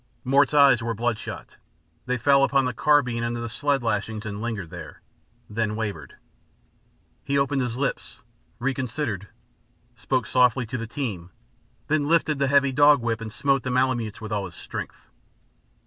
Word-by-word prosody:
Mort's 140 +2 +3
eyes 140 -6 +6
were 115 0 -2
bloodshot; 115 0 -4 0.5
they 125 0 0
fell 140 +3 +4
upon 135 -1 +3
the 125 - -1
carbine 125 -3 +2
under 120 0 -2
the 120 - -4
sled 140 +3 -1
lashings, 110 0 -2
and 100 -1 -5
lingered 110 -8 -4
there, - - -9 0.5
then 105 0 -2
wavered. 100 -10 -5 1.1
He 140 - 0
opened 140 0 +1
his 125 -1 -3
lips, 135 0 -3 0.4
reconsidered, 125 - -3 0.7
spoke 130 +1 -1
softly 125 -1 +3
to 125 +3 -4
the 115 - -5
team, 105 -9 -4 0.6
then 150 -1 0
lifted 155 -3 +2
the 140 - +2
heavy 140 0 +3
dog 145 +2 +6
whip 115 -1 -2
and 110 -1 -6
smote 135 +3 +1
the 130 - -4
Malemutes 125 -4 0
with 110 -1 -7
all 100 -2 -1
his 85 - -10
strength. - - -8
125 Hz, 160 wpm, -25 LUFS, 110-140 Hz, 1.1 s, eyes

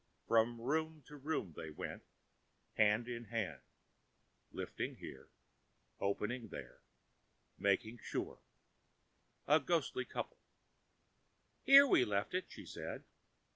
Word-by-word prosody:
From 115 +1 +3
room 155 +4 -1
to 150 - -11
room 140 - -2
they 80 - -6
went, 75 - -6 0.7
hand 110 +2 +3
in 120 -1 -5
hand, 110 -2 -3 0.9
lifting - - -4
here, 65 - -10 0.7
opening 110 +4 -1
there, 70 - -9 0.8
making 110 +4 +1
sure—a 150 +2 -4
ghostly 145 -5 0
couple. - - -5 1.2
"Here 275 +1 +10
we 235 - +5
left 100 - -1
it," 185 +1 0
she - - -9
said. - - -6
120 Hz, 100 wpm, -37 LUFS, 105-150 Hz, 1.2 s, Here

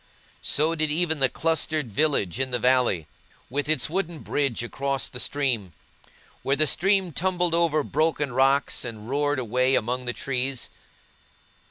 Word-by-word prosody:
So 155 +3 +1
did 155 -2 0
even 160 0 0
the 135 -1 +3
clustered 155 -4 0
village 130 - +1
in 130 0 0
the 125 - 0
valley, 125 -9 +2 0.5
with 145 +3 -2
its 155 -5 +3
wooden 175 0 -2
bridge 140 -5 -1
across 135 +2 -2
the 125 - -8
stream, 125 - -1 0.7
where 135 - +1
the 155 - +2
stream 190 +3 +2
tumbled 180 +1 0
over 165 -3 +2
broken 150 -2 0
rocks, 135 +2 +2
and 110 -3 -7
roared 145 +2 0
away 130 +2 +1
among 125 +2 -1
the 120 - 0
trees. 130 -1 -2
140 Hz, 150 wpm, -25 LUFS, 125-155 Hz, 0.7 s, the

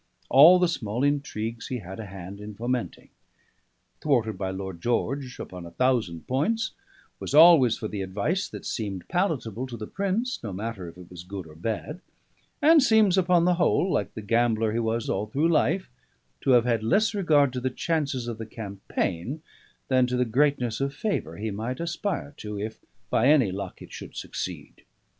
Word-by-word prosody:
All 155 +7 +9
the 180 0 +3
small 120 -6 -2
intrigues 120 -6 -1
he 130 - -3
had 95 -1 -8
a 110 - -6
hand 95 +1 -9
in 105 0 -8
fomenting; 120 +3 -3 0.9
thwarted 115 -9 +1
my 95 -1 -2
Lord 95 -2 -6
George 125 +3 -1
upon 90 -1 -7
a 85 - -8
thousand 110 -6 0
points; 220 - 0 0.5
was - - -3
always 155 -7 +8
for 110 - -4
the 105 -2 -4
advice 105 - -1
that - - -9
seemed 100 -5 -4
palatable 130 - -1
to 120 -2 -7
the 105 - -6
Prince, 200 - -2
no 110 - -5
matter 100 -2 -5
if 85 - -15
it 90 -1 -13
was 90 -1 -8
good 95 0 -7
or 80 - -13
bad; 110 - -4 0.6
and 315 +1 +7
seems 220 -7 +4
upon 180 -2 +3
the 180 - +4
whole 180 +2 +2
(like 100 -1 -1
the 110 - -6
gambler 115 0 +2
he 115 - -1
was 115 0 -1
all 100 +2 -1
through 145 +9 +1
life) 175 +4 +2 0.5
to - - -1
have 120 -1 +5
had 115 -3 +1
less 205 - +2
regard 150 -9 +3
to 125 - -2
the 130 - 0
chances 140 -4 -2
of 115 -2 -5
the 110 - -6
campaign 100 - -4 0.4
than 130 -1 +3
to 125 0 -1
the 125 - +2
greatness 125 -1 +1
of 140 0 -1
favour 150 - -2
he 110 +1 -3
might 115 +6 -4
aspire 170 -2 -3
to, 105 -1 -6
if, 110 +2 -5 0.3
by 120 - +3
any 140 -9 +5
luck, 95 -1 -6
it - - -13
should - - -9
succeed. - - -6
120 Hz, 185 wpm, -26 LUFS, 105-150 Hz, 0.9 s, All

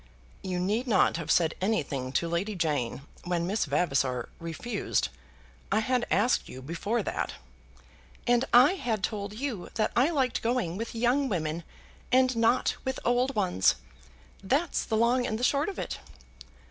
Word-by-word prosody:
"You 185 -2 -3
need 210 +8 0
not 190 -7 +3
have 165 - -6
said 165 -2 +3
anything 145 - -1
to 170 - +1
Lady 180 +5 -1
Jane 145 -7 -1 0.2
when 175 -1 -1
Miss 205 +5 0
Vavasor 135 -5 0
refused. 165 +8 -2 0.6
I 215 - +3
had 250 +1 0
asked 215 +6 +2
you 130 - -9
before 200 - -2
that." - - -2 0.9
"And 240 0 +3
I 250 +6 +7
had 235 - -2
told 205 -1 -2
you 230 -5 -4
that 215 - +1
I 255 +6 +4
liked 270 -7 0
going 230 -8 0
with 230 +3 -5
young 250 +4 +2
women, 165 -3 -2 0.5
and 255 0 +4
not 230 +2 +2
with 265 0 -2
old 250 +3 +2
ones. 180 - +3 0.7
That's 280 - +1
the 220 - 0
long 245 +2 +3
and 220 - -2
the 240 - -5
short 285 +7 +2
of 390 - -7
it." - - -4
215 Hz, 160 wpm, -28 LUFS, 170-245 Hz, 0.9 s, I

